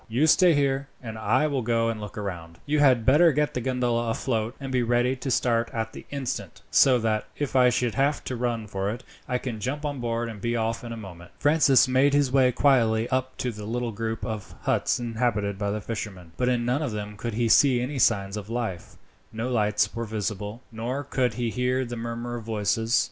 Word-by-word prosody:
You 125 +7 +2
stay 170 +1 +5
here, 140 -1 +1 0.2
and 110 -2 -6
I 110 +7 +1
will 140 -4 0
go 115 0 +1
and 110 -2 -4
look 105 0 -8
round. 85 -5 -6
You 150 +1 +1
had 130 -6 +4
better 155 +6 +6
get 150 +1 0
the 125 - -2
gondola 120 -2 0
afloat, 115 0 -1
and 135 -2 -6
be 125 -1 +2
ready 120 +2 +2
to 130 +2 -4
start 115 -2 +1
at 110 -1 -3
the - - -10
instant, 140 -3 -5
so 130 -2 +6
that, 110 -2 -1
if 145 -2 -3
I 125 -1 +6
should 120 -1 0
have 140 +2 +1
to 130 - -4
run 120 -2 -2
for 100 -1 -3
it, 120 +4 -5 0.2
I 125 - 0
can 120 -3 -5
jump 145 +8 -3
on 145 -2 -3
board 120 0 -2
and 110 -3 -8
be 120 +1 -1
off 115 0 -1
in 120 - -7
a 115 - -5
moment." 90 -5 -10
Francis 145 -2 +4
made 135 +2 +3
his 145 -3 +2
way 130 -2 +4
quietly 120 -4 +3
up 130 0 -1
to 125 - -2
the 105 -1 -8
little 120 +2 -2
group 115 +1 -4
of 110 -2 -6
huts - - +1
inhabited 110 -4 -1
by 100 -1 -1
the 105 +1 -2
fishermen, 95 -6 -6
but 125 0 +1
in 120 -1 0
none 125 +5 +1
of 135 -8 -2
them 105 0 -5
could 115 +1 -4
he 120 0 +1
see 130 +2 +5
any 130 +3 -3
signs 100 -3 +2
of 105 0 -7
life 115 -7 -4 0.4
no 115 +3 -3
lights 105 -3 +1
were 115 0 -2
visible, 105 +1 -4
nor 120 +5 -3
could 130 -3 0
he 120 -2 -1
hear 125 +2 0
the 120 0 -6
murmur 120 +1 -4
of 115 - -8
voices. 110 +2 +1
120 Hz, 225 wpm, -26 LUFS, 110-130 Hz, 0.4 s, better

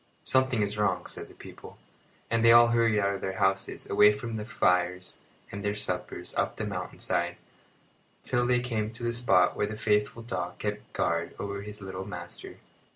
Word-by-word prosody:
"Something 130 -4 +2
is 105 +1 -3
wrong," 105 - +1
said - - -8
the - - -17
people; - - -12 0.5
and 115 0 +2
they 115 - +8
all 120 0 +8
hurried 115 -2 +3
out 100 0 +1
of 95 - -5
their 95 - -2
houses, 95 0 0
away 105 0 +6
from 115 +2 -5
their 105 0 -5
fires 90 -3 +1 0.3
and 100 +1 -6
their 105 0 0
suppers, 90 -3 -3
up - - 0
the - - -3
mountain - - -5
side, - - -1 0.9
till 120 0 +1
they 125 0 +3
came 110 -4 -2
to 115 - -9
the 120 0 0
spot 95 -7 +3
where 105 - 0
the 110 +1 -6
faithful 105 +2 +1
dog 90 -6 -4
kept 105 0 -4
guard 85 0 -1
over 100 0 -4
his 105 0 -9
little 95 0 -6
master. 90 -3 -8
105 Hz, 190 wpm, -28 LUFS, 95-115 Hz, 0.9 s, they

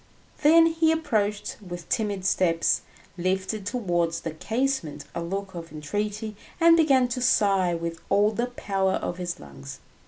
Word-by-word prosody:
Then 325 +2 +7
he 325 -1 +3
approached 210 -10 -1
with 175 -3 -8
timid 205 -4 -1
steps, 170 -3 +2 0.4
lifted 190 +3 -1
towards 175 -8 -1
the 165 - -4
casement 225 - -2
a 170 - -3
look 195 +3 -4
of 170 -2 -8
entreaty, 210 +8 -4 0.2
and 335 0 +7
began 275 -6 +4
to 250 +1 -3
sigh 195 -7 +3
with 165 0 -4
all 205 +1 +4
the 235 +3 -1
power 195 -5 -1
of 175 - -3
his 175 -1 -4
lungs. 70 -1 -10
200 Hz, 150 wpm, -26 LUFS, 175-245 Hz, 0.4 s, Then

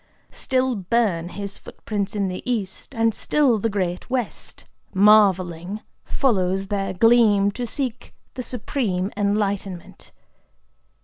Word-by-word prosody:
Still 260 0 0
burn 190 -4 0
his 200 +1 -7
footprints 205 -1 -4
in 200 -2 0
the 185 0 -4
East; 230 +1 -3
and 225 0 +2
still 265 -4 +2
the 225 - 0
great 185 -2 -2
West, 250 -4 -4 0.3
marvelling, 190 -2 +4 0.2
follows 195 -6 0
their 195 -2 -1
gleam 210 -1 +4
to 245 +3 -4
seek 255 -1 -4 0.2
the 255 - -5
Supreme 215 -6 -2
Enlightenment. 200 -3 -2
205 Hz, 115 wpm, -23 LUFS, 190-235 Hz, 0.3 s, marvelling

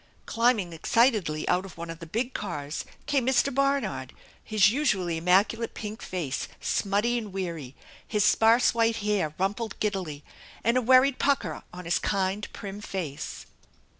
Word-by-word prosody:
Climbing 230 -7 +1
excitedly 190 - +2
out 180 - +2
of 190 -4 -11
one 170 0 -5
of 165 - -9
the 165 - -9
big 235 +9 -2
cars 150 -7 -4 0.2
came 270 -4 +1
Mr. 265 +1 +3
Barnard, 275 +1 0 0.3
his 210 -2 +4
usually 190 - 0
immacu 190 +6 +3
late 230 - -4
pink 215 0 -6
face 160 -8 -3
smutty 210 +4 +1
and 215 -3 -7
weary; 170 -8 -5 0.3
his 210 -2 +1
sparse 230 +2 +5
white 230 0 +2
hair 185 -8 0
rumpled 205 +3 -2
giddily, 185 -9 -2 0.4
and 235 +2 +2
a 255 - +3
worried 255 +2 +5
pucker 215 - 0
on 180 0 -9
his 170 - +1
kind, 195 +1 -1
prim 200 +1 -7
face. 170 -9 -5
205 Hz, 155 wpm, -27 LUFS, 175-235 Hz, 0.4 s, sparse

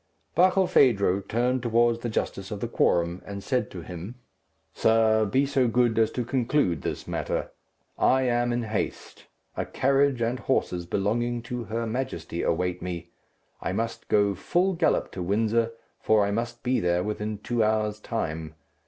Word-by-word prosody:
Barkilphedro 135 - +4
turned 125 +3 +1
towards 120 0 +2
the 120 - -3
justice 100 -3 -3
of 105 - -5
the 120 - -2
quorum, 85 -5 +1
and 100 -1 -7
said 125 +4 0
to 90 -3 -8
him, 90 +7 -7 0.6
"Sir, 110 -1 +3
be 130 +7 +2
so 135 -2 +2
good 120 -1 +2
as 110 -1 +4
to 125 - -2
conclude 125 - +1
this - - -4
matter. - - -2 0.5
I 130 0 +4
am 120 -1 +1
in 120 0 -1
haste. 110 -1 -4 0.3
A - - -1
carriage 135 -1 +2
and 120 +2 -1
horses 90 -10 -1
belonging 120 +5 -1
to 120 0 -5
her 115 +2 -2
Majesty 125 +4 -3
await 90 -1 -1
me. 85 -1 -5 0.5
I - - -2
must 115 +3 -3
go 100 -1 +3
full 180 - +1
gallop 165 -2 +1
to 95 - -6
Windsor, 110 +5 +1 0.3
for 110 -2 +3
I 100 - -1
must 120 +3 -3
be 125 +1 +1
there 90 0 +1
within 105 +1 -3
two 115 +2 0
hours' 105 -1 0
time. 80 -8 -4
115 Hz, 160 wpm, -26 LUFS, 100-120 Hz, 0.6 s, Barkilphedro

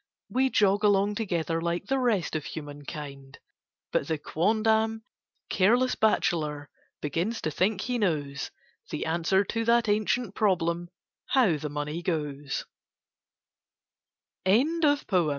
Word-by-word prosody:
We 265 +1 +2
jog 205 -2 +3
along 205 0 +3
together, 170 -6 -1
like 170 +2 -1
the 270 +4 0
rest 220 -11 +1
of 155 - -1
human 145 -2 -7
kind: 140 -3 -8 0.5
But - - 0
the 160 - 0
quondam 220 +7 +1 0.4
"careless 240 +7 +3
bachelor" 150 -9 0 0.3
begins 170 - -1
to 155 - -1
think 190 +6 +1
he 245 +1 -1
knows 145 -8 -1 0.4
The - - -3
answer 170 +4 +2
to 230 +3 -2
that 235 0 +3
ancient 215 +1 +1
problem 175 -5 +1 0.4
"how 235 - +4
the 150 +1 -5
money 150 +3 -3
g 175 - 0
185 Hz, 115 wpm, -28 LUFS, 155-220 Hz, 0.5 s, how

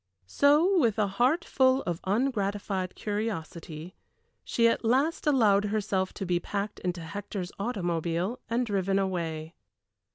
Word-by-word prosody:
So 300 - +4
with 230 -8 +2
a 215 - +3
heart 245 - +1
full 260 0 +3
of 175 -2 -3
ungratified 200 -4 -1
curiosity, 180 -6 -4 0.5
she 230 -1 +2
at 230 - +1
last 270 +9 +1
allowed 210 -8 +4
herself 200 -3 -1
to 195 - -4
be 175 -1 +1
packed 200 +3 -4
into 180 -1 -3
Hector's 190 +2 -5
automobile 175 -1 -1
and 240 +2 +1
driven 195 -2 0
away. 165 -4 -2
200 Hz, 130 wpm, -28 LUFS, 180-235 Hz, 0.5 s, So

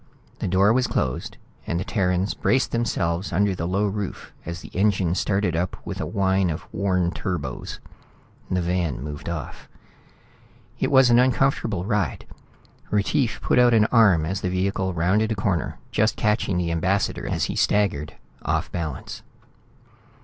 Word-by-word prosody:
The - - -2
door 95 +4 +4
was 125 +1 +2
closed, 65 - -2 0.3
and 85 - -1
the - - -2
Terrans 95 -1 0
braced 130 +1 +1
themselves 95 -6 -1
under 100 +2 +2
the 85 -2 -3
low 100 +3 +1
roof 100 -1 -4
as 85 0 -5
the - - -10
engine 95 -3 +2
started 95 -2 0
up 85 +2 -1
with - - -5
a - - -2
whine 95 -2 +1
of 80 - -4
worn 90 -3 +1
turbos. 85 - -4 0.7
The 90 -1 0
van 85 -7 -1
moved 75 +2 -6
off. 80 -5 -6 1.1
It - - +1
was 130 -3 +6
an 120 - +6
uncomfortable 125 -7 +1
ride. 105 -5 -1 0.6
Retief 110 +4 0
put - - +2
out 120 -1 +5
an 110 -1 +5
arm 100 -9 +5
as 95 +4 -3
the 90 - -1
vehicle 95 +1 0
rounded 95 +6 +1
a - - 0
corner, 95 -4 -1
just 110 +1 +2
catching 105 -4 +1
the 85 -1 0
ambassador 95 +4 0
as - - -1
he - - -2
staggered, 95 -8 +1 0.3
off - - -1
balance. 85 -3 -5
95 Hz, 155 wpm, -24 LUFS, 85-105 Hz, 1.1 s, was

